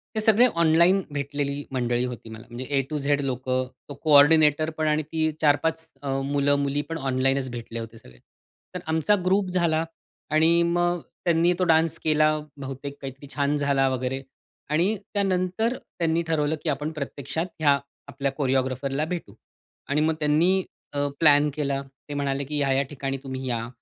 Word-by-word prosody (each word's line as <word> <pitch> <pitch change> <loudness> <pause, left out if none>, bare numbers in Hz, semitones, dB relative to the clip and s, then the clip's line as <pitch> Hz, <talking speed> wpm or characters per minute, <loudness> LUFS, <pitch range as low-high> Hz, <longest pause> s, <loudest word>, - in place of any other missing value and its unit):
हे - - +1
सगळे 220 +2 +5 0.2
ऑनलाईन 170 +4 +5
भेटलेली 145 0 -3
मंडळी 120 -1 0
होती 120 -2 -7
मला. 110 +1 -10
म्हणजे 130 +4 -2
A - - -8
टू 155 - -2
Z 145 0 +1
लोकं, 130 -1 -1 0.2
तो 145 - -5
कोऑर्डिनेटरपण, 155 +1 +5
आणि 150 0 +1
ती 155 +1 -1
4-5 160 +2 +1
अ, 140 - -4 0.2
मुलं-मुलीपण 145 +2 0
ऑनलाईनच 135 -1 0
भेटले 115 -1 -6
होते 115 0 -8
सगळे. 65 - -17 0.6
तर - - -2
आमचा 160 +6 +2
ग्रुप 190 0 +2
झाला 170 -3 +1 0.5
आणि 160 +2 +4
मग 175 0 +1 0.3
त्यांनी 170 +1 +3
तो - - +2
डान्स 165 -1 +3
केला, 155 0 +4 0.3
बहुतेक 140 +1 -7
काहीतरी 135 +1 -8
छान 145 0 +1
झाला 140 -2 +2
वगैरे 130 +1 -2 0.5
आणि 175 +8 +2 0.2
त्यानंतर 195 +4 0
त्यांनी 165 0 -2
ठरवलं, 155 -1 +1
की 165 - 0
आपण 150 +2 -2
प्रत्यक्षात 140 +1 -4
ह्या 145 -2 +4 0.3
आपल्या 140 -1 -2
कोरिओग्राफरला 135 +1 -1
भेटू. 175 +1 -5 0.6
आणि 145 +2 +2
मग 160 0 +2
त्यांनी 165 +6 +3 0.3
अ, 145 0 +1
प्लॅन 150 -1 +5
केला 140 -2 -1 0.3
ते - - -4
म्हणाले, 140 -1 -1
की 150 +2 -3
ह्या-ह्या 135 -1 +2
ठिकाणी 135 -1 -3
तुम्ही 130 -1 -5
या. 115 -1 -2
145 Hz, 155 wpm, -25 LUFS, 135-160 Hz, 0.6 s, सगळे